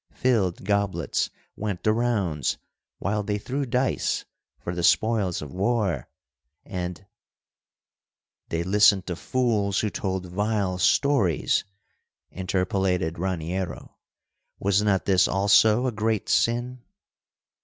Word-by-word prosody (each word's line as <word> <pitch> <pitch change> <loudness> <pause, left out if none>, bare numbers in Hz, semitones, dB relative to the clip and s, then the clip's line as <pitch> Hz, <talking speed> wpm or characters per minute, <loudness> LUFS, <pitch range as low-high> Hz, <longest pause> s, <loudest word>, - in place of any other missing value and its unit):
Filled 105 -10 +1
goblets 100 -1 0 0.3
went 105 -4 -4
the 110 - +3
rounds 100 - 0 0.4
while 105 +2 -1
they 105 0 -2
threw 135 +6 -3
dice 125 +2 0 0.3
for 85 - -5
the 90 - -3
spoils 90 +1 +2
of 70 - -9
war 95 - 0 0.6
and——" 90 0 -5 1.4
"They 85 0 -1
listened 100 0 +4
to 90 - -3
fools 105 -3 0
who 105 - -1
told 95 -1 -3
vile 100 0 -1
stories," 130 - +2 0.7
interpolated 90 -2 -1
Raniero. 90 0 -3 0.6
"Was 100 +1 +2
not 100 -3 +1
this 95 -1 +4
also 110 +4 +4
a 130 - +1
great 110 -1 -1
sin?" 120 +2 +1
100 Hz, 110 wpm, -25 LUFS, 90-110 Hz, 1.4 s, listened